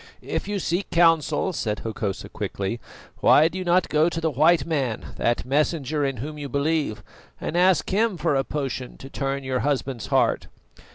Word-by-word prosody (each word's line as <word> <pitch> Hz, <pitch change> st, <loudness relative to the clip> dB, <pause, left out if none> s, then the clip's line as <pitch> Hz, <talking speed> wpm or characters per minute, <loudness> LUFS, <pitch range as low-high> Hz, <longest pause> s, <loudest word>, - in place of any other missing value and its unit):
"If -, -, -3 dB
you 205 Hz, 0 st, -1 dB
seek 185 Hz, +1 st, -1 dB
counsel," 165 Hz, +2 st, +3 dB
said 105 Hz, -9 st, -2 dB
Hokosa 105 Hz, -3 st, -4 dB
quickly, 100 Hz, +4 st, -4 dB, 0.4 s
"why 155 Hz, -, +6 dB
do 185 Hz, +3 st, -5 dB
you -, -, -3 dB
not 180 Hz, +1 st, +3 dB
go 155 Hz, +2 st, +3 dB
to 165 Hz, -, -3 dB
the 160 Hz, -1 st, 0 dB
white 155 Hz, +2 st, +4 dB
man, 135 Hz, -9 st, -2 dB
that 120 Hz, 0 st, 0 dB
Messenger 150 Hz, +1 st, 0 dB
in 135 Hz, -2 st, -2 dB
whom 150 Hz, +5 st, -6 dB
you 145 Hz, -1 st, -5 dB
believe, 140 Hz, -6 st, 0 dB, 0.4 s
and -, -, -4 dB
ask 180 Hz, 0 st, +4 dB
him 210 Hz, 0 st, +2 dB
for 150 Hz, -, +1 dB
a 135 Hz, -, +2 dB
potion 135 Hz, -3 st, -4 dB
to 135 Hz, -, -10 dB
turn 135 Hz, 0 st, -2 dB
your 130 Hz, -1 st, -1 dB
husband's 135 Hz, -4 st, -2 dB
heart?" -, -, +2 dB
145 Hz, 180 wpm, -24 LUFS, 130-170 Hz, 0.4 s, why